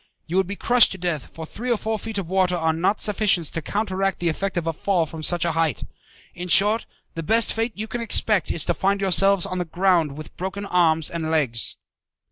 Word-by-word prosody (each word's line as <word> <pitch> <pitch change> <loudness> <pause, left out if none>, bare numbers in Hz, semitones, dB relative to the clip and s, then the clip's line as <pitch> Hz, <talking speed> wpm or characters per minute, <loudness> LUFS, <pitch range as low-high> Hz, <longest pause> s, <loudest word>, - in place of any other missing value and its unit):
You 175 +3 -2
would 190 -2 +2
be 200 - -5
crushed 240 +3 +4
to - - -7
death, 170 -6 -3
for 160 - -9
three 240 +9 -6
or 240 - +2
four 220 0 -3
feet 225 +1 -6
of 195 -4 -3
water 185 0 +1
are 160 -1 +1
not 180 +6 0
sufficient 205 -5 +1
to 165 - -3
counteract 195 +1 -2
the 175 - -1
effect 190 +4 -3
of 170 - -1
a 165 - -1
fall 180 0 0
from 160 0 -9
such 175 +2 +1
a 170 - +1
height. 160 -5 0 0.5
In 180 +1 -7
short, 205 +5 +3 0.3
the 165 - -5
best 225 +8 +2
fate 225 +1 -2
you 215 - -3
can 240 +1 -5
expect 215 -4 +3
is 160 - -1
to 175 - +1
find 195 +4 0
yourselves 195 0 +3
on 185 -2 -4
the - - 0
ground 170 -4 +1
with 155 - -10
broken 190 +2 -5
arms 165 -4 +2
and 165 -2 -3
legs." 135 -8 0
180 Hz, 230 wpm, -23 LUFS, 165-200 Hz, 0.5 s, crushed